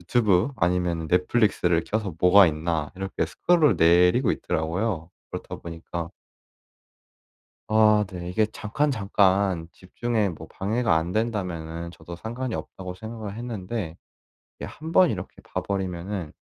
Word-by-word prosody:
유튜브 105 +3 +2
아니면은 85 -2 0
넷플릭스를 90 -2 +2
켜서 105 -5 -2
'뭐가 95 +1 +7
있나.' 80 -1 -1
이렇게 95 0 -2
스크롤 160 - +3
내리고 90 +9 +5
있더라고요. 85 +1 -2 0.2
그렇다 - - -6
보니까 85 0 -6 1.6
아 105 -1 +5
네. 90 -1 -6
이게 110 +4 +2
잠깐, 115 +8 -1
잠깐 95 -5 +2
집중에 110 +2 -1
뭐 80 - -9
방해가 110 -1 0
안 80 +2 0
된다면은 85 -7 -3
저도 85 0 -10
'상관이 120 +6 -4
없다.'고 90 -1 -7
생각을 110 0 -7
했는데 110 -6 -5 0.6
이게 - - -7
1 160 +2 -8
번 180 -2 +6
이렇게 95 -3 -6
봐 - - -4
버리면은 95 -3 -3
95 Hz, 300 characters per minute, -25 LUFS, 85-110 Hz, 1.6 s, 뭐가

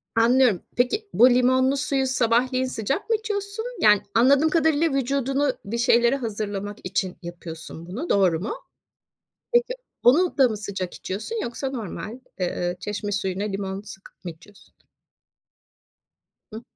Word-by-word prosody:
Anlıyorum. 230 -3 +4 0.2
Peki, 400 - 0
bu 245 +3 +7
limonlu 260 +2 +3
suyu 265 0 0
sabahleyin 255 +1 +1
sıcak 260 - -3
mı 450 - +4
içiyorsun? 420 0 -4 0.2
Yani 210 -2 +6
anladığım 275 +6 +5
kadarıyla 320 -1 +2
vücudunu 275 +1 0
bir 230 +4 -3
şeylere 235 +1 +4
hazırlamak 205 -4 -4
için 185 0 -2
yapıyorsun 170 -1 -9
bunu. 235 - -6
Doğru 185 -5 +3
mu? 205 - -3 1.0
Peki, 485 +1 +3 0.3
onu 320 +9 +4
da 265 -2 +6
mı 215 - -3
sıcak 195 -3 -5
içiyorsun 225 - -4
yoksa 255 +3 -4
normal, 230 0 -6 0.2
ııı, 175 0 -1
çeşme 205 +1 -4
suyuna 195 -1 -2
limon 195 -1 -3
sıkıp 195 -2 -14
mı 175 - -3
içiyorsun? 170 +5 -19 1.8
Hıı. 220 +2 -7
235 Hz, 135 wpm, -24 LUFS, 200-275 Hz, 1.8 s, bu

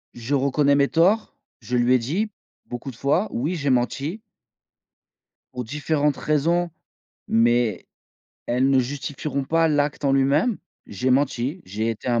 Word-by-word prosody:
je 120 +4 -4
reconnais 140 +1 +2
mes 140 0 +4
torts, 190 +7 +2 0.2
je 125 +2 -2
lui 120 +1 +3
ai 130 - +4
dit 185 - -2 0.3
beaucoup 120 +2 -6
de 130 - -9
fois: 140 - +1
«Oui, 145 +9 -1
j'ai 145 -5 -1
menti 135 - 0 1.3
pour 125 -1 -4
différentes 150 +3 0
raisons, 170 +4 +1 0.6
mais 115 -2 +2 0.6
elles 125 +3 +2
ne 135 - +4
justifieront 140 +2 -3
pas 165 +3 +2
l'acte 145 -1 0
en 135 - +3
lui-même. 140 - +2 0.3
J'ai 105 +6 -2
menti, 135 +4 0
j'ai 110 +4 -3
été 115 +3 -5
un 120 -1 +2
140 Hz, 150 wpm, -23 LUFS, 125-150 Hz, 1.3 s, mes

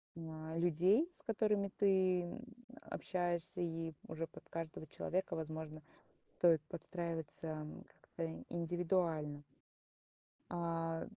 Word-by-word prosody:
м, 165 -1 -5 0.3
а, - - 0
людей, 180 - +5
с - - -19
которыми 210 -4 +2
ты, 190 -2 +5
м, 175 +7 -5 0.4
общаешься, 175 -2 -1
и 165 -1 -1
уже 160 +1 -2
под 160 - -13
каждого 160 -1 -4
человека, 185 +5 0
возможно, 155 -1 -4 0.6
стоит 165 -3 +6
подстраиваться 165 -3 -3 0.2
как-то 165 -1 -5
индивидуально. 170 -3 +1 1.1
А 165 -1 0
170 Hz, 100 wpm, -38 LUFS, 160-180 Hz, 1.1 s, стоит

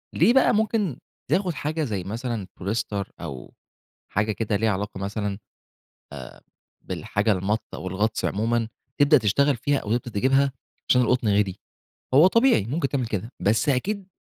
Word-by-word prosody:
ليه 210 +9 +5
بقى 265 - +5
ممكن 210 - 0 0.3
تاخُد 185 -2 +1
حاجة 155 +2 -2
زي 105 -9 -3
مثلًا 110 0 -4
بوليستر 100 0 -3
أو 70 -7 -8 0.6
حاجة 105 +2 +1
كده 110 0 -2
ليها 110 +2 +1
علاقة 100 0 -3
مثلًا 100 +1 -3
آآ - - -8 1.5
بالحاجة 105 +2 0
المَط 100 +3 0
أو 95 - -5
الغطس 105 +4 -1
عمومًا، 115 +2 0 0.3
تبدأ 145 +1 +6
تشتغل 135 +6 +2
فيها 140 +4 0
أو 110 0 -1
تبدأ 120 0 -5
تجيبها 135 +3 +3 0.4
عشان 125 0 +5
القُطن 120 -1 +1
غالي؟ 100 -2 +2 0.6
هو 150 +6 +8
طبيعي 230 - +4
ممكن 140 +6 -1
تعمل 130 -4 -1
كده، 110 +2 -4
بس 105 +8 +2
أكيد 195 +9 -1
115 Hz, 150 wpm, -24 LUFS, 105-145 Hz, 1.5 s, هو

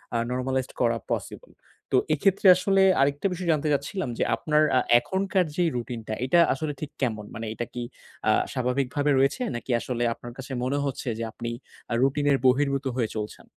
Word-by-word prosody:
আ - - +3
normalised 130 +1 -2
করা - - +2
possible. - - -4 0.4
তো - - +4 0.2
এক্ষেত্রে 195 0 +2
আসলে 195 +1 +3 0.2
আরেকটা 140 +6 +1
বিষয় 180 -1 -3
জানতে 155 -1 0
চাচ্ছিলাম 145 +3 -2
যে - - +1
আপনার 150 +5 +2
আ - - +6 0.2
এখনকার 190 +3 0
যেই 175 -2 +2
রুটিন 120 0 -4
টা 110 - -2
এটা 155 +7 +4
আসলে 150 +2 -3
ঠিক 150 -1 -6
কেমন? 110 -5 -1
মানে 115 0 -5
এটা 120 - -4
কি 120 - -4 0.5
আ - - +6 0.2
স্বাভাবিকভাবে 135 +3 0
রয়েছে 135 - +2
নাকি 120 +2 -5
আসলে 120 0 -3
আপনার 120 +1 -10
কাছে 135 +1 -8
মনে 130 +3 0
হচ্ছে 135 -1 -4
যে - - -2
আপনি 120 0 -5 0.4
আ - - +1
রুটিনের 140 +1 +2
বহির্ভূত 140 +1 +2
হয়ে 120 -4 0
চলছেন? 105 0 -6
135 Hz, 180 wpm, -26 LUFS, 125-155 Hz, 0.5 s, আ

